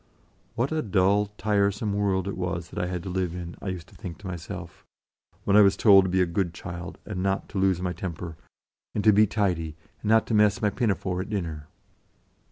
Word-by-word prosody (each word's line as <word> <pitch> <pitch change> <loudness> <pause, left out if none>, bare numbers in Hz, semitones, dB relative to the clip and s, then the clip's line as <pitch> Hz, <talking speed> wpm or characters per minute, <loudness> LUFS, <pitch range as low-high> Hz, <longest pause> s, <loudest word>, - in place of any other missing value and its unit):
What 125 +5 0
a 160 0 0
dull, 100 -1 +2
tire 100 -1 +2
some 105 +1 -3
world 100 -2 0
it 100 - -3
was 85 -2 -3
that - - -5
I - - -1
had 90 -1 -4
to 95 - -5
live 90 -2 -1
in, 85 -1 -6
I - - -6
used 90 -3 -4
to - - -19
think 90 -6 -7
to 105 - -9
myself, 85 -3 -7 0.6
when 100 - +2
I 105 - +9
was 100 -1 +5
told 100 -3 +7
to - - -1
be 95 0 +3
a - - +2
good 85 0 -1
child, 85 0 -7
and 95 -4 -4
not 95 0 0
to 95 - -3
lose 95 -2 +2
my 90 -1 -1
temper, 85 -1 -6 0.6
and 105 - 0
to 110 - +6
be 105 +2 +5
tidy, 90 -7 -1 0.3
and 105 - -2
not 110 +1 +4
mess 105 -3 +4
my 105 0 +1
pinafore 95 -5 -1
at 95 - -7
dinner. 80 -8 -4
95 Hz, 220 wpm, -26 LUFS, 90-105 Hz, 0.6 s, I